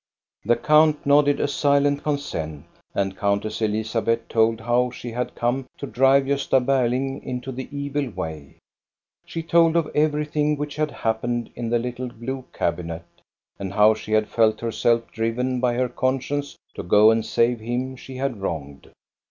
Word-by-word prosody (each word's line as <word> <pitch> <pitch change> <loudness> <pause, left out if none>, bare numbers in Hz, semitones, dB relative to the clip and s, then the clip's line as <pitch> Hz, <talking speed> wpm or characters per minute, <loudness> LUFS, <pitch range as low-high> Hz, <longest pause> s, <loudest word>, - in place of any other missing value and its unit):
The 120 +3 +3
count 150 +4 +3
nodded 145 0 +4
a - - +1
silent 145 0 +2
consent, 80 - -3 0.3
and 95 -1 -1
Countess 100 +3 -1
Elizabeth 110 +2 0
told 115 0 +2
how 120 +2 +2
she 120 -1 -8
had 125 +2 -3
come 125 +2 -1
to - - -5
drive 135 +2 +4
Gosta 140 -1 +2
Ber 130 -1 +2
ling 135 +2 -2
into 125 +1 -5
the 130 0 -6
evil 140 -1 -2
way. 80 -7 -7 0.7
She 165 - -5
told 165 0 +4
of 165 -2 +1
everything 150 0 +1
which 145 0 -4
had 155 0 +1
happened 120 -1 -2
in 120 -1 -4
the 120 - +2
little 125 +1 -4
blue 125 +2 -6
cabinet, 85 0 -3 0.5
and 95 -1 -5
how 105 +1 +6
she 110 0 -6
had 110 0 +3
felt 110 -2 +2
herself 115 0 +1
driven 125 +3 -1
by 120 -1 +1
her 125 +1 +1
conscience 135 +3 -2 0.2
to - - -6
go 105 +5 +6
and 115 0 +1
save 115 +2 +1
him 125 +4 -3
she 130 +1 -10
had 130 -5 -3
wronged. 70 -7 -5
125 Hz, 165 wpm, -23 LUFS, 110-140 Hz, 0.7 s, how